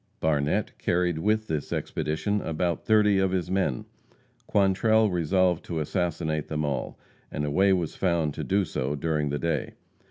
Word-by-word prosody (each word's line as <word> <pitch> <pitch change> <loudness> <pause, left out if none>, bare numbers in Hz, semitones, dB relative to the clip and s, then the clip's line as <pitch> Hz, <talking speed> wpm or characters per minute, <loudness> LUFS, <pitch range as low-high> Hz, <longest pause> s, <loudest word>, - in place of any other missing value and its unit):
Barnette 75 -2 0
carried 90 -2 0
with 110 +4 +1
this 80 -7 -3
expedition 80 +7 -1
about 85 +1 -2
thirty 105 -2 +4
of 95 0 +2
his 90 -1 -2
men. 95 -10 0 0.6
Quantrell 105 +2 +3
resolved 90 0 +1
to 85 -2 -3
assassinate 80 -2 -2
them 75 -1 -2
all, 70 -2 -3 0.3
and 75 - -2
a 75 - -2
way 95 +6 +4
was 90 -4 0
found 85 -5 0
to - - -5
do 100 0 +1
so 70 -2 -2
during 75 0 -1
the 70 - -1
day. 85 +2 -2
85 Hz, 160 wpm, -26 LUFS, 75-95 Hz, 0.6 s, thirty